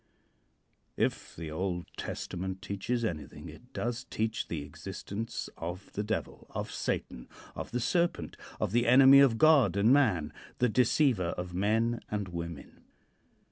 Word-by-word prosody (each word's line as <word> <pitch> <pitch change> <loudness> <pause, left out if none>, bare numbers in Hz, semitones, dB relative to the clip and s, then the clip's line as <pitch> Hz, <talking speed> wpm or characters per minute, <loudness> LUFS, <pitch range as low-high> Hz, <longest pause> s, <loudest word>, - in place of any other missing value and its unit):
If - - -1
the 80 -1 -6
Old 90 +1 -2
Testament 95 +2 -5
teaches 115 +5 -2
anything, 80 -8 -5
it - - -14
does 120 0 -3
teach 110 +1 -2
the 80 -4 -4
existence 95 +8 -6
of 90 +4 -6
the 105 - -2
Devil, 105 0 -4
of - - -5
Satan, - - -3 0.2
of - - -6
the 125 - -2
Serpent, 170 +8 0 0.2
of - - -1
the 120 +2 +2
enemy 135 +2 +8
of 135 -5 +5
God 150 -7 +5
and 110 +5 +5
man, 110 - +2 0.2
the 125 - +2
deceiver 120 - +2
of 90 0 -5
men 110 +5 +1
and 105 -3 -3
women. 85 -3 -7
105 Hz, 140 wpm, -30 LUFS, 90-120 Hz, 0.2 s, enemy